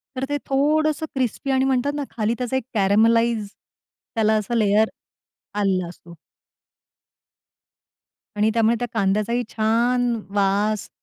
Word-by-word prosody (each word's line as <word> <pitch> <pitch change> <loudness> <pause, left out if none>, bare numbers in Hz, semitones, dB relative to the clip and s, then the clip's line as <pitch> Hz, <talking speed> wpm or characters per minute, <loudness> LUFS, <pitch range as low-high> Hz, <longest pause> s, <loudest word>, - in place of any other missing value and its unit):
तर 260 +1 -2
ते 290 - 0
थोडंसं 305 +3 +1
क्रिस्पी 260 +1 -1
आणि 265 0 +2
म्हणतात 270 +1 +1
ना, 290 - -2
खाली 220 0 -1
त्याचा 250 0 -3
एक 260 - -3
कॅरमलाइज 220 +2 +3 0.7
त्याला 220 -1 +2
असा 215 +3 -2
लेयर 215 0 +3 0.7
आलेला 185 -3 +1
असतो. 170 0 -13 2.2
आणि 210 +1 +2
त्यामुळे 230 0 +3
त्या 245 - -2
कांद्याचाही 215 +3 0
छान! 235 +2 +1 0.2
वास 200 +1 0
230 Hz, 120 wpm, -22 LUFS, 210-250 Hz, 2.2 s, कॅरमलाइज